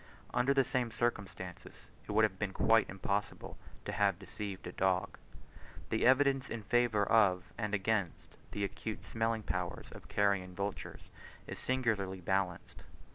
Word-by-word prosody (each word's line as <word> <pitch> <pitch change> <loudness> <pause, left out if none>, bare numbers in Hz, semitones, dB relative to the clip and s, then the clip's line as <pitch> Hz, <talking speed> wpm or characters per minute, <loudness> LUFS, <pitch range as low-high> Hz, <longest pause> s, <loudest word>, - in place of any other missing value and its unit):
Under 130 +3 +3
the 135 -1 +4
same 125 -2 0
circumstances, 100 -6 -4 0.2
it - - -4
would 110 +1 +4
have 95 -3 +1
been 100 -3 -2
quite 115 +2 +4
impossible 100 +2 -3 0.3
to - - -2
have 100 -3 +2
deceived 95 +1 -6
a 90 - -5
dog. 95 +1 0 0.7
The 110 - +3
evidence 135 0 +4
in 115 -2 -4
favour 115 -2 +3
of 95 -5 +3
and 105 -2 -1
against 100 -3 -1
the 100 - -3
acute 110 +2 -4
smelling 115 -1 -1
powers 90 -2 -3
of - - -11
carrion 100 -3 +1
vultures 100 +1 -5 0.3
is - - -7
singularly 110 -7 0
balanced. 90 -1 -2
100 Hz, 145 wpm, -34 LUFS, 95-115 Hz, 0.7 s, the